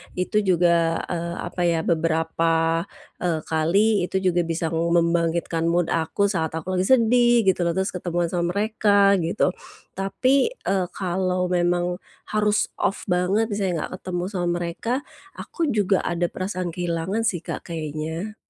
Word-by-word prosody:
itu 185 +4 0
juga, 170 -3 +3 0.2
eee, 170 0 -3
apa 180 0 -5
ya 165 -1 +1
beberapa, 165 0 +1 0.3
eee, 170 -3 0
kali 180 +5 +2
itu - - -9 0.2
juga 175 - +2
bisa 165 0 -2
membangkitkan 170 0 +1
mood 175 0 +1
aku 165 +5 0
saat 160 -3 -2
aku 165 +4 -4
lagi 185 - +1
sedih, 240 -1 +4
gitu 180 -2 +2
loh. 170 - -1
Terus, 190 +1 0
ketemuan 175 -2 -2
sama 175 +1 -1
mereka, 205 -2 +3
gitu. 175 +2 +1 0.4
Tapi, 260 - +1
eee, 190 - -1
kalau 185 -1 -1
memang 175 0 +1 0.3
harus 210 0 +1
off 200 - -1
banget 195 +5 +1
misalnya 200 -3 -1
enggak - - -6
ketemu 180 -1 -3
sama 180 -3 -2
mereka, 175 +6 -3 0.4
aku 330 -3 -3
juga 205 -5 +2
ada 175 0 -1
perasaan 185 -2 -3
kehilangan 175 +6 -1
sih 175 -6 -2
Kak, - - -6
kayaknya. 160 +5 -5
175 Hz, 145 wpm, -23 LUFS, 170-200 Hz, 0.4 s, sedih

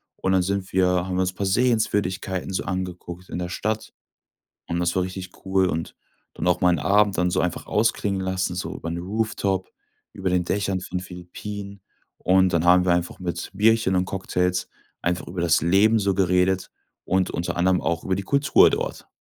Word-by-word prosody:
und 95 - -1
dann 95 - +4
sind 100 0 -2
wir 95 -1 +4
haben 90 0 0
wir 95 - +1
uns 90 0 0
'n - - -32
paar 100 - -2
Sehenswürdigkeiten 100 -4 0
so - - -1
angeguckt 90 -1 -5
in - - -4
der 90 0 -3
Stadt 110 +3 -3 0.7
und 85 +1 -2
das 85 0 0
war 90 - +3
richtig 95 0 -6 0.2
cool, 95 0 +3
und 80 -2 -3 0.4
dann - - -4
auch 90 0 +2
mal 90 - +4
'n 85 - +1
Abend 100 +3 +3
dann 90 +1 +1
so - - +1
einfach 90 -1 -2
ausklingen 105 -3 0
lassen, 95 -1 -1
so 90 - -4
über 85 - -6
'n 85 - -3
Rooftop, 100 -1 -2 0.4
über 95 -1 -2
den 90 -1 +1
Dächern 95 0 -1
von 90 0 -4
Philippinen. 100 +2 -8 0.3
Und 95 0 +3
dann 85 0 +1
haben 90 +1 +6
wir 90 - +3
einfach 90 +1 -1
mit 90 -1 -4
Bierchen 110 -1 +3
und 90 0 +1
Cocktails 90 -1 -1 0.3
einfach 90 +1 -1
über 90 0 -5
das 85 -2 +3
Leben 100 +6 +4
so 100 -1 +1
geredet 90 0 +1 0.3
und 95 0 +1
unter 85 +1 -3
anderem 90 0 +2
auch 85 -1 -1
über 95 - 0
die 100 - -3
Kultur 140 +4 +5
dort. - - -3
95 Hz, 195 wpm, -24 LUFS, 90-100 Hz, 0.7 s, haben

